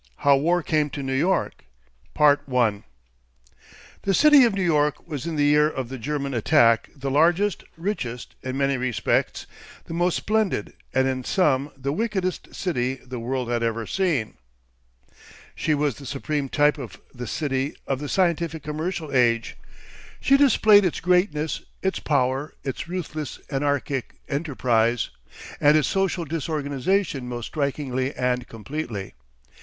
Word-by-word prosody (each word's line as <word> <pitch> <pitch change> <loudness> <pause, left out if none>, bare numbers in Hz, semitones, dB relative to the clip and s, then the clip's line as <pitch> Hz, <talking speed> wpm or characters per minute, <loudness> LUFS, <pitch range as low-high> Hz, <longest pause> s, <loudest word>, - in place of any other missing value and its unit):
HOW 140 -1 +7
WAR 170 +4 +1
CAME 150 -2 +1
TO 140 0 -5
NEW 135 0 -2
YORK 175 +8 0 0.5
1 125 -8 +3 1.2
The 195 - 0
City 295 - +7
of 225 -4 +1
New 195 - 0
York 150 -3 +1
was 150 -3 -5
in 165 - -3
the 145 -1 +2
year 150 +1 +4
of 130 -5 -5
the 130 -1 -6
German 140 +2 -3
attack 115 -1 +3
the 135 -1 -4
largest, 175 +7 +2
richest, 150 - -4
in 130 0 -4
many 140 -1 +1
respects 125 -4 0 0.4
the - - -7
most 175 +1 +1
splendid, 215 - 0 0.2
and 130 0 +2
in 130 -1 -2
some, 145 -4 +1
the 140 +1 -2
wickedest 190 -2 -2
city 130 -8 -1
the 130 -1 -8
world 125 +1 -2
had 120 -1 0
ever 115 -1 -1
seen. 160 - -1 1.2
She 155 - 0
was 145 -4 0
the 140 - -9
supreme 140 +1 -2
type 145 +1 +3
of 125 -5 -8
the 125 -2 -6
City 135 +1 -2
of 135 -1 -1
the 145 0 -5
Scientific 170 -4 0
Commercial 155 0 -4
Age; 115 -2 +2 0.6
she 275 - +4
displayed 220 -7 +6
its 180 - 0
greatness, 180 -4 +1 0.2
its 190 0 0
power, 135 0 0
its 135 +3 -4
ruthless 155 -5 -5
anarchic 140 -2 -1
enterprise, 125 -6 0 0.5
and 150 +1 +5
its 155 - +2
social 190 -3 0
disorganisation 150 0 -1
most 120 -1 -4
strikingly 140 -2 -2
and 125 -1 -1
completely. 115 -4 -6
145 Hz, 145 wpm, -24 LUFS, 130-170 Hz, 1.2 s, HOW